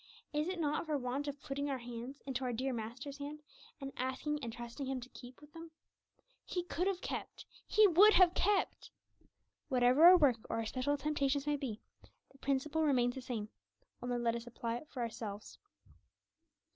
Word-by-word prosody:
Is 300 +2 0
it 370 -1 -3
not 305 +1 0
for 300 -2 +1
want 265 +3 -3
of 285 0 -4
putting 280 0 -3
our 270 - -1
hands 245 +3 -8
into 265 -1 -3
our 250 - -1
dear 255 +3 -1
Master's 250 +6 -6
hand, 295 +1 -7 0.4
and 275 -1 -6
asking 260 +3 -2
and 230 - -3
trusting 240 +4 -6
Him 265 -1 -2
to 250 +1 -10
keep 250 0 -12
them? 330 0 -9 0.7
He 355 - -3
could 360 +1 -1
have 380 -2 -1
kept; - - -5 0.2
He 430 - +6
would 400 +5 +7
have 360 -2 +7
kept! 405 +2 0 0.8
Whatever 255 +4 +5
our 365 +1 +11
work 280 -8 +4
or - - -1
our 225 0 -1
special 260 +5 0
temptations 285 -1 0
may 295 0 +1
be, 255 -7 -4 0.5
the 270 - -21
principle 280 +4 0
remains 250 -5 +3
the 265 - -6
same, 225 -4 -4 0.5
only 245 0 -1
let 235 -1 +1
us 235 0 -6
apply 235 0 -3
it 305 - -11
for 255 - -5
ourselves. 220 -3 -6
270 Hz, 185 wpm, -35 LUFS, 245-300 Hz, 0.8 s, our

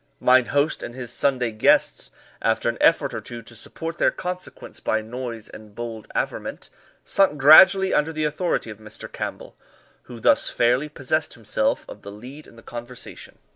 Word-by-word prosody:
Mine 130 0 +5
host 145 +2 +1
and 120 - -7
his 125 -2 -6
Sunday 125 -4 0
guests, 110 - +2 0.3
after 110 0 +1
an 120 - 0
effort 150 -5 +3
or 110 - -3
two 115 +2 -8
to 120 - -13
support 165 +8 -6
their - - +4
consequence 180 0 -7
by 110 - 0
noise 115 0 -6
and 105 -1 -13
bold 115 -2 -6
averment, - - -4 0.3
sunk 195 -7 +2
gradually 190 +7 +8
under 150 +2 +2
the 155 -1 -3
authority 150 -5 -1
of 105 - -11
Mr. 110 0 -10
Campbell, - - -6 0.5
who 120 -2 -10
thus - - +3
fairly 125 +5 +1
possessed 130 -3 -2
himself - - -1
of - - -11
the 100 - -9
lead 130 +9 -11
in - - -17
the 115 - -15
conversation. 120 +1 -9
125 Hz, 175 wpm, -23 LUFS, 115-150 Hz, 0.5 s, gradually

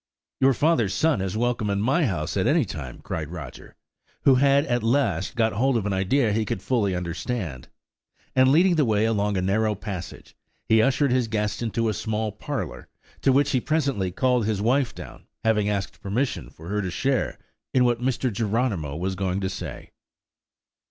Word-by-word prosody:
"Your 135 -1 +4
father's 130 - +2
son 155 -11 +2
is 95 +2 -2
welcome 120 -3 0
in 100 0 0
my 135 +8 +2
house 85 -7 -2
at - - +1
any - - +3
time!" - - -7
cried - - -4
Roger, - - -9 0.5
who 135 - +6
had 140 +2 +4
at 120 -3 0
last 130 +4 0
got 115 -2 +2
hold 130 +4 +2
of 105 - -2
an 105 - 0
idea 105 +5 +2
he 110 +1 +1
could 110 -3 -4
fully 105 -7 +1
understand; 85 - -4 0.7
and 130 0 +5
leading 175 +3 +4
the 150 - +4
way 110 -3 +2
along 105 -2 +1
a 90 - 0
narrow 105 +3 +1
passage, 95 -4 -7 0.3
he 110 0 +5
ushered 135 +3 +2
his 125 -2 +2
guest 105 0 -2
into 115 0 -1
a 110 - +1
small 110 0 -2
parlour, 105 - -5 0.3
to 135 - +4
which 140 +2 +3
he 130 - +1
presently 140 - 0
called 125 +3 +1
his 110 -3 0
wife 125 +4 +1
down, - - -11 0.2
having 105 -2 +2
asked 100 -2 -3
permission 115 +7 -2
for 80 - -13
her 105 +2 -1
to 95 - -3
share 130 +6 -1 0.3
in 125 -1 +3
what 120 -1 +1
Mr. 130 -1 0
Geronimo 105 - -1
was 95 +4 -2
going 95 0 -1
to 95 -1 -2
say. 90 -7 -7
110 Hz, 185 wpm, -25 LUFS, 100-130 Hz, 0.7 s, who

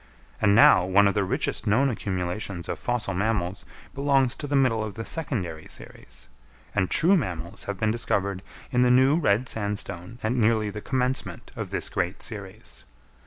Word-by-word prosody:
And 100 0 +4
now 110 - +7
one 100 +2 +4
of 100 - +2
the 105 - +1
richest 95 - -2
known 130 +6 +3
accumulations 95 -3 -3
of - - -4
fossil 120 -5 -2
mammals 95 -1 -1 0.3
belongs 135 -2 +2
to 145 - -5
the 145 - -1
middle 125 -5 +3
of 105 -2 -6
the 115 +1 -5
secondary 95 - -3
series; - - -10 0.5
and 95 -3 +1
true 180 +5 +5
mammals 90 - -3
have 100 -2 -4
been 110 -1 +2
discovered 100 -4 -1 0.3
in 125 -2 +2
the 125 - +4
new 130 +4 +5
red 125 -4 +2
sandstone 100 -2 -4
at 110 - +1
nearly 110 -3 +2
the 105 +1 -7
commencement 130 +1 -2
of - - -5
this - - -2
great 90 0 -2
series. 105 -1 -9
105 Hz, 170 wpm, -26 LUFS, 95-125 Hz, 0.5 s, now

